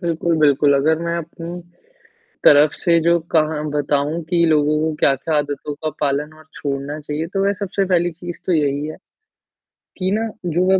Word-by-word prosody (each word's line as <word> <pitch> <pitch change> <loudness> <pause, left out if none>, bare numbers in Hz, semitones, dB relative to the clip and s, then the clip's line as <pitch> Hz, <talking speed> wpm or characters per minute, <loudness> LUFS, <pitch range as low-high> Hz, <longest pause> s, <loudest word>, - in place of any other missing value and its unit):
बिल्कुल, 170 -1 0
बिल्कुल, 145 -1 +4
अगर 155 +4 +2
मैं 170 0 -1
अपनी 170 +1 -7 0.8
तरफ 145 +1 +6
से 170 -2 +2
जो 170 +1 +3
कहा 155 -1 +2
बताऊ 145 +2 0
कि 170 -2 +3
लोगों 150 -1 +3
को 160 0 -1
क्या-क्या 140 +4 +2
आदतों 145 0 -3
का 155 +2 -4
पालन 145 +1 -1
और 155 - -16
छोड़ना 140 +1 -4
चाहिए, 150 +2 -4
तो 195 +3 -2
वह 200 - +2
सबसे 195 0 -1
पहली 175 -2 +1
चीज़ 175 +1 -8
तो 185 - +1
यही 145 -2 +1
है, 155 - -7 1.0
कि 185 0 -1
ना 220 +2 0 0.2
जो 175 +1 +1
155 Hz, 170 wpm, -20 LUFS, 145-170 Hz, 1.0 s, तरफ